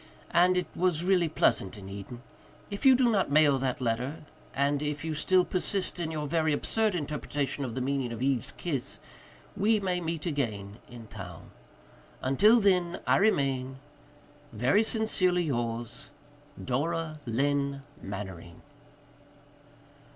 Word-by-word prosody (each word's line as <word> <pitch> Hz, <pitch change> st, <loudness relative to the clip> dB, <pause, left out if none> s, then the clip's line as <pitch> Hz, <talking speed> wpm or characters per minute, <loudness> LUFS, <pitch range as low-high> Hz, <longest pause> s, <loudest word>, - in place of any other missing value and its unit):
And 180 Hz, +2 st, +4 dB
it 180 Hz, -, +1 dB
was 175 Hz, -2 st, +1 dB
really 180 Hz, -3 st, +3 dB
pleasant 115 Hz, -10 st, +1 dB
in 95 Hz, -1 st, -10 dB
Eden. 100 Hz, +5 st, -8 dB, 0.5 s
If 200 Hz, +7 st, +1 dB
you 260 Hz, -, +8 dB
do 245 Hz, -2 st, +3 dB
not 195 Hz, -8 st, +1 dB
mail 145 Hz, -2 st, +4 dB
that 130 Hz, -1 st, -1 dB
letter, 125 Hz, +5 st, -2 dB, 0.3 s
and 140 Hz, +1 st, +1 dB
if 150 Hz, +1 st, -3 dB
you 160 Hz, -, -2 dB
still 180 Hz, +4 st, +3 dB
persist 185 Hz, 0 st, -2 dB
in 165 Hz, -2 st, -2 dB
your 155 Hz, -2 st, -3 dB
very 155 Hz, 0 st, +1 dB
absurd 215 Hz, +6 st, +1 dB
interpretation 145 Hz, -2 st, -3 dB
of 120 Hz, -3 st, -4 dB
the 130 Hz, -, -2 dB
meaning 135 Hz, -2 st, -1 dB
of 115 Hz, -, -5 dB
Eve's 130 Hz, -2 st, 0 dB
kiss, 140 Hz, -8 st, -4 dB, 0.6 s
we 215 Hz, +2 st, +3 dB
may 180 Hz, -2 st, -1 dB
meet 165 Hz, -2 st, -3 dB
again 110 Hz, -, -3 dB
in 120 Hz, -2 st, -10 dB
town. 95 Hz, -5 st, -10 dB, 0.7 s
Until 210 Hz, -, +5 dB
then 180 Hz, -4 st, +2 dB
I -, -, +4 dB
remain, 135 Hz, -10 st, +1 dB, 0.7 s
"Very 125 Hz, -, +3 dB
sincerely 200 Hz, -6 st, +1 dB
yours, 120 Hz, -5 st, -3 dB, 0.6 s
"Dora 155 Hz, +4 st, -2 dB
Lynne 140 Hz, +3 st, 0 dB, 0.2 s
Mannering." 95 Hz, -4 st, -8 dB
145 Hz, 135 wpm, -29 LUFS, 125-180 Hz, 0.7 s, you